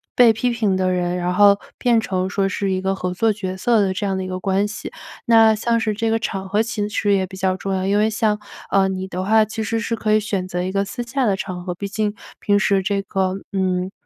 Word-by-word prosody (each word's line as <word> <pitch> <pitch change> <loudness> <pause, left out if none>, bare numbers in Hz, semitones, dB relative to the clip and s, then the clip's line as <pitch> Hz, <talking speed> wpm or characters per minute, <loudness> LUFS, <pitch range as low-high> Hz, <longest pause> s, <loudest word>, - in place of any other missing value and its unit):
被 240 -2 +6
批 245 +3 0
评 220 -5 0
的 185 0 +1
人， 180 -1 -1
然 180 0 -1
后 200 +1 +5 0.2
变 235 -3 +2
成 185 -3 -2
说 195 0 0
是 195 0 -2
一 185 0 -1
个 190 0 0
合 180 -1 -3
作 220 +4 +2
角 190 -3 -4
色 230 +4 +2
的 190 -2 +1
这 205 +2 -3
样 195 -1 -1
的 190 - -3
一 - - -5
个 185 0 -4
关 195 +2 +1
系。 215 - -7 0.3
那 225 -2 +6
像 230 +2 0
是 220 -1 0
这 225 +2 -1
个 225 0 +1
场 195 -3 -4
合 210 +2 +2
其实 210 -2 -1
也 190 -1 +2
比 190 +1 -11
较 185 0 0
重 195 +1 -4
要， 190 0 -1
因 200 +1 +2
为 215 +1 +3
像， 215 -1 0 0.3
呃， 195 -1 +4
你 190 0 -4
的 185 0 -4
话， 220 +2 +4
其 220 +1 -4
实 225 +2 -1
是 230 0 -2
可 215 -1 -1
以 215 - +5
选 200 -3 -3
择 180 -1 -3
一 185 - -2
个 195 +1 +1
私 240 +5 -5
下 255 +2 -1
的 200 -4 +2
场 185 -2 -5
合。 180 -1 -3
毕 200 +3 -5
竟， 210 +1 -1 0.3
平 205 -1 +2
时 200 -2 +2
这 200 +1 -1
个 190 -1 -1 0.2
嗯， 185 -1 0
200 Hz, 285 characters per minute, -21 LUFS, 190-220 Hz, 0.3 s, 被